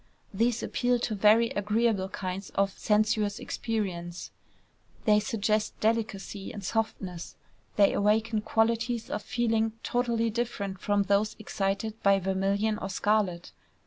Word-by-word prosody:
These 230 +3 +1
appeal 245 0 +1
to 235 -2 -2
very 215 +3 +4
agreeable 210 -1 +1
kinds 190 0 -5
of 195 0 +2
sensuous 210 -1 +1
experience: 180 -6 -4 0.7
they 210 -1 +5
suggest 215 -2 -1
delicacy 215 -3 -1
and 205 - -8
softness; 190 -4 -3 0.4
they 200 -1 +5
awaken 215 +2 +2
qualities 230 +1 0
of 210 - -2
feeling 225 -2 0
totally 235 -2 0
different 205 -4 -3
from 205 +1 +1
those 200 +2 +1
excited 210 +1 -2
by 200 0 +5
vermilion 195 +3 0
or 195 - -4
scarlet. 195 -3 0
210 Hz, 120 wpm, -28 LUFS, 195-225 Hz, 0.7 s, they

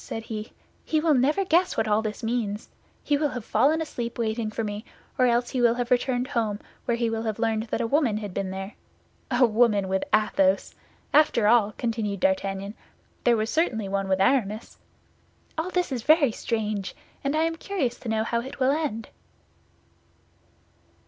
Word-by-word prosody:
said 225 - -5
he; 215 -1 -6 0.3
"he 310 - +1
will 315 0 +3
never 295 +9 +2
guess 360 +1 +2
what 220 - +1
all 210 +1 +3
this 215 +2 -5
means. 225 -3 -2 0.3
He 290 - +2
will 300 +1 +1
have 245 -4 -6
fallen 290 +8 +3
asleep 235 -6 -5
waiting 225 -1 -1
for 220 +1 -3
me, 205 0 -4 0.3
or 255 - +3
else 240 0 +1
he 255 - -1
will 235 -1 +4
have 245 0 -3
returned 250 +1 +1
home, 220 -6 -1 0.3
where 235 -1 0
he 235 0 0
will 225 0 -2
have 220 -2 -2
learned 225 -1 0
that 225 - -2
a - - 0
woman 245 -3 +2
had 205 -3 -6
been 195 0 -2
there. 195 +2 -6 0.6
A 250 0 +4
woman 215 -3 +3
with 190 0 0
Athos! 195 -2 +2 0.4
After 285 -8 +4
all," 215 -2 +4
continued 220 -4 -2
D'Artagnan, 195 +1 0 0.5
"there 235 -1 +5
was 215 +1 -1
certainly 235 - 0
one 195 0 -2
with 190 0 +2
Aramis. 215 0 0 0.8
All 325 +3 -2
this 360 -4 -1
is 250 -3 -2
very 300 0 +4
strange; 215 -3 -3 0.3
and 280 +2 0
I 315 - +2
am 330 0 0
curious 320 -9 -2
to 235 - -6
know 220 0 +1
how 235 +1 -1
it 265 +3 -9
will 260 +1 +3
end." 280 -7 -2
230 Hz, 185 wpm, -26 LUFS, 210-260 Hz, 0.8 s, there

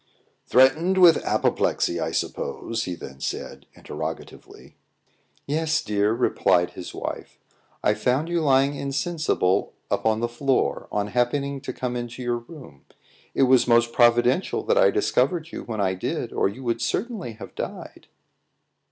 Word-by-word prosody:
"Threatened 155 +9 +4
with 175 -3 +6
apoplexy, - - 0
I - - -1
suppose?" 115 -1 -3
he 90 - -4
then 65 -4 -10
said, - - -5
interrogatively. - - -8 0.7
"Yes, 160 +2 0
dear," 105 0 +1
replied 90 -5 +2
his 90 0 -8
wife. - - -6 0.5
"I - - +3
found 130 +6 0
you 170 -1 0
lying 135 -1 +3
insensible 140 - -1 0.2
upon 110 0 +1
the 120 - 0
floor, 135 +3 0
on 105 0 -1
happening 135 +4 -1
to 135 - -5
come 125 -1 -4
into 120 +1 -5
your 120 -1 -1
room. 120 - -14 0.5
It - - +3
was 130 -2 +4
most 120 0 +3
providential 120 +7 +3
that 485 - +1
I - - +6
discovered 170 - 0
you - - -7
when 110 -2 -5
I 95 -2 +1
did, 95 - -4
or - - +1
you 125 +7 -10
would 115 -1 -1
certainly 190 - -2
have 110 - -11
died." - - -7
125 Hz, 145 wpm, -24 LUFS, 115-155 Hz, 0.7 s, with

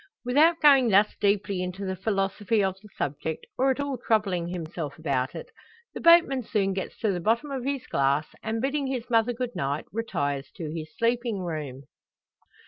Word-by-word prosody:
Without 310 +7 +4
going 275 -5 +6
thus 205 +1 +4
deeply 200 -2 +1
into 180 +2 -4
the 190 0 -2
philosophy 200 +1 0
of 190 -1 0
the 210 - -15
subject, 150 +3 -3
or 265 +2 +2
at 265 - 0
all 280 -3 -2
troubling 200 -7 0
himself 165 -4 -5
about 135 -4 -1
it, - - -8 0.4
the - - -6
boatman 335 -6 +6
soon 200 -4 0
gets 190 0 -5
to 215 - +2
the 180 - -2
bottom 230 - 0
of 260 -2 -4
his 275 -2 -2
glass, 140 +2 +1 0.2
and 225 +1 -3
bidding 280 0 0
his 255 -2 -3
mother 225 +1 +3
good 245 0 -4
night, 140 +2 -2
retires 145 -11 -2
to 155 -3 -5
his 155 -1 -5
sleeping 235 -3 0
room. 150 -6 -5
205 Hz, 180 wpm, -26 LUFS, 170-245 Hz, 0.4 s, going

